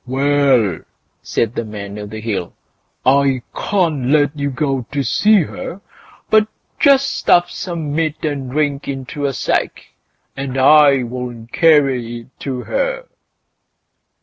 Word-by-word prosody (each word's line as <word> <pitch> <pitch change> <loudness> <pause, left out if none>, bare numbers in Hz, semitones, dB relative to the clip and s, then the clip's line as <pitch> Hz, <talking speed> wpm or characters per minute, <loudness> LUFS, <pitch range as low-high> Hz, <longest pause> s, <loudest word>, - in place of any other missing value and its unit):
"Well!" 135 - +2 0.4
said 115 -1 -1
the 115 - -3
Man 105 -1 -7
o' 105 - -6
the 110 +1 -7
Hill, 100 -6 -3 0.5
"I 135 -1 +3
can't 165 -10 0
let 145 +1 +2
you 140 -1 -2
go 135 -3 -2
to 145 -1 -1
see 205 - +3
her; 170 +4 -7 0.5
but 215 0 +4 0.3
just 275 -2 +4
stuff 175 0 +3
some 165 -5 -4
meat 155 0 -1
and 140 -4 -3
drink 145 0 -1
into 135 +1 -4
a 135 - -2
sack, - - -2 0.5
and 135 -1 -4
I'll 125 -4 +3
carry 135 -8 +2
it 120 +3 -22
to 130 -3 -4
her." - - -2
140 Hz, 130 wpm, -18 LUFS, 125-155 Hz, 0.5 s, but